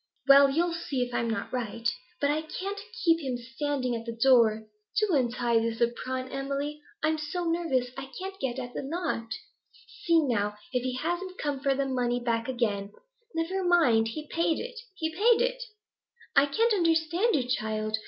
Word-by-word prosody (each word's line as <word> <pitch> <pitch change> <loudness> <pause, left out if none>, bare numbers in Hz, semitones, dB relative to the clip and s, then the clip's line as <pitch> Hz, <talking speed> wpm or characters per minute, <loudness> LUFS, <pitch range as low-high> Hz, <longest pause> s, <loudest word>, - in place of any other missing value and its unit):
'Well, 275 0 +8
you'll 335 +5 +1
see 285 -6 -2
if 245 0 -6
I'm 235 - 0
net 215 +1 -3
right. 235 -2 -2 0.3
But 285 0 +2
I 305 +1 0
can't 390 +5 -5 0.2
keep 330 -1 +5
him 260 -5 -2
standing 255 +1 -2
at 230 - -4
the 230 0 -5
door. 230 -4 +5 0.4
Do 420 -4 +1
untie 240 -2 +2
this 225 0 -2
apron, 255 +2 -1
Emily; 280 +2 -3 0.2
I'm 315 0 +2
so 305 +4 -3
nervous, 330 -8 0
I 270 - -7
can't 385 +1 -6
get 255 -2 -2
at 245 -1 -5
the - - -3
knot. 285 -5 -2 0.8
See, 335 -2 +5
now, 210 -5 0 0.2
if 250 - +1
he 255 0 -2
hasn't 350 +6 -3
come 290 -2 -2
for 275 -1 +1
the 275 0 0
money 245 -2 0
back 230 -2 -1
again.' 210 -5 -1 0.4
'Never 360 +4 -1
mind; 310 -11 +4
he 300 +7 -5
paid 335 0 +1
it! 485 0 -6 0.2
He 320 -3 -2
paid 450 +6 +4
it!' - - 0 0.7
'I 280 - +6
can't 455 +10 +2
understand 335 +4 +2
you, 255 -4 0
child. 215 -2 -1
275 Hz, 180 wpm, -28 LUFS, 240-335 Hz, 0.8 s, Well